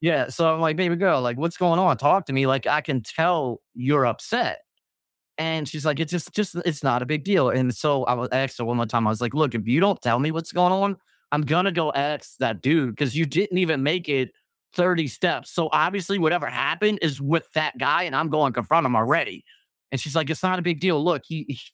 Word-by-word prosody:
Yeah. 165 0 +1
So, 165 -2 +2
I'm 160 - -4
like, 160 -1 +1
"Baby 175 -1 +1
girl," 185 -7 +3
like, 120 -1 -2
"What's 170 +3 -2
going 175 -2 +3
on? 180 -3 +4
Talk 145 +8 +3
to 135 - -6
me." 135 0 +2
Like, 130 -2 +1
"I 150 - +3
can 135 -5 -3
tell 160 -3 0
you're 135 +1 +2
upset." 115 - -2 0.8
And 160 -2 -2
she's, 155 +3 -7
like, 150 -1 +1
"It's 165 -1 -2
just 175 -3 -4
just 205 -5 -2
it's 150 -4 -2
not 125 -2 +2
a - - -3
big 150 +2 -2
deal." 190 -10 +3
And 130 -1 +1
so, 140 -2 0
I 120 - +2
w 125 +1 -2
asked 130 0 -1
her 120 - -3
one 120 +1 -1
more 120 - 0
time. 115 -1 +1
I - - +3
was 110 - -4
like, 120 +2 -2
"Look, 150 -5 +1
If 110 -1 -4
you 125 +6 +3
don't 200 0 +2
tell 120 0 +1
me 150 +3 0
what's 165 0 -5
going 180 +1 +3
on, 195 0 0 0.3
I'm 150 - +1
gonna 180 +7 +2
go 165 -3 0
ask 145 +1 -3
that 110 -3 -1
dude, 135 -5 +1
'cause 145 -2 -1
you 165 +1 +2
didn't 180 +5 0
even 160 -6 +1
make 170 +2 0
it 130 -3 0 0.4
30 180 -4 +2
steps. 175 +8 -2
So, 165 -3 -1
obviously, 195 +1 +1
whatever 170 +2 +1
happened 210 -1 0
is 140 -4 -1
with 160 +4 0
that 155 0 0
guy, 175 - +2
and 175 - -4
I'm 160 - +1
going 150 -2 +2
confront 150 +7 +2
him 125 -2 +1
already." 110 +1 +1 0.5
And 135 - -2
she's, 150 - -6
like, 160 -3 +1
"It's 160 +2 -4
not 185 -1 +1
a - - -3
big 170 -3 -1
deal. 175 -6 +2
Look. 170 -6 +1
He 160 -2 -7
he 130 -4 -7
155 Hz, 250 wpm, -23 LUFS, 135-170 Hz, 0.8 s, on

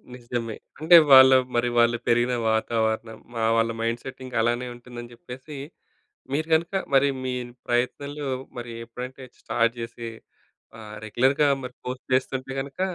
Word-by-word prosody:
నిజమే. 120 -2 -4 0.2
అంటే 160 +3 +6 0.2
వాళ్ళ 130 0 +10 0.2
మరి 120 +1 +2
వాళ్ళు 120 0 +4
పెరిగిన 120 +1 +3 0.2
వాతావరణం 110 0 -1 0.2
మా 115 - -1
వాళ్ళ 115 0 +2
మైండ్‌సెట్ 120 +3 -3
ఇంక 130 -1 -8
అలానే 120 +2 0
ఉంటుందని 120 0 -10
జెప్పేసి 130 +5 -10 0.8
మీరు 155 +3 0
గనుక 165 +4 +2 0.2
మరి 135 +1 +5 0.2
మీ 130 0 -2
ఈ - - -8 0.2
ప్రయత్నంలో 140 +4 -1 0.3
మరి 120 -1 -6
ఎప్పుడంటే 125 +3 -8 0.2
స్టార్ట్ 115 +1 0
జేసి 115 0 -6 0.7
ఆహ్, 105 -1 -9
రెగ్యులర్‌గా 135 +6 +2
మరి 125 0 -7
పోస్ట్ 125 0 -5
జేస్తుంటే 130 +1 -1
గనుక 140 +3 -10
120 Hz, 140 wpm, -25 LUFS, 115-130 Hz, 0.8 s, వాళ్ళ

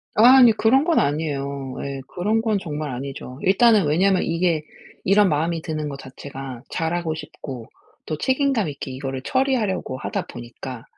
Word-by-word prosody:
아 215 - +5 0.2
아니 245 -3 +8
그런 225 +5 +3
건 330 0 +3
아니에요. 140 -2 -2
예. 140 -1 -5
그런 210 +5 0
건 220 -2 +1
정말 150 -3 -4
아니죠. 130 0 -7
일단은 210 +1 +5
왜냐하면 185 +5 +3
이게 165 -1 +1 0.4
이런 200 0 +5
마음이 160 +2 0
드는 155 -1 -3
것 140 -1 -6
자체가 135 -2 -8
잘 165 +1 -2
하고 170 -2 -1
싶고 135 -6 -8 0.4
또 155 - -3
책임감 260 - +1
있게 140 -2 -6
이거를 135 0 -5
처리하려고 240 - 0
하다 - - -3
보니까 120 0 -8
155 Hz, 345 characters per minute, -22 LUFS, 135-205 Hz, 0.4 s, 아니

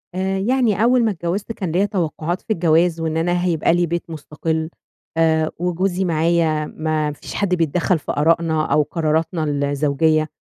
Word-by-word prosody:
آآ، 190 +1 -1
يعني 225 0 +1
أول 245 +1 +4
ما 220 - +2
اتجوّزت 185 +4 -3
كان 190 -6 -4
ليّا 185 +5 +2
توقعات 175 -2 -2
في 220 - -1
الجواز 165 -1 +2
وإن 160 0 -1
أنا 175 +2 0
هيبقى 165 -2 +2
لي 175 0 +2
بيت 170 +1 -4
مُستقل 160 +1 -3 0.5
آآ، 160 -1 +2
وجوزي 180 +2 0
معايا 160 -2 +1
ما 155 -1 -2
فيش 145 - -9
حد 190 -3 +1
بيتدخّل 170 +1 +1
في - - -4
آراءنا 160 0 +1
أو 150 - +4
قراراتنا 160 +2 -1
الزوجية، 145 +2 +1
165 Hz, 160 wpm, -20 LUFS, 155-180 Hz, 0.5 s, أول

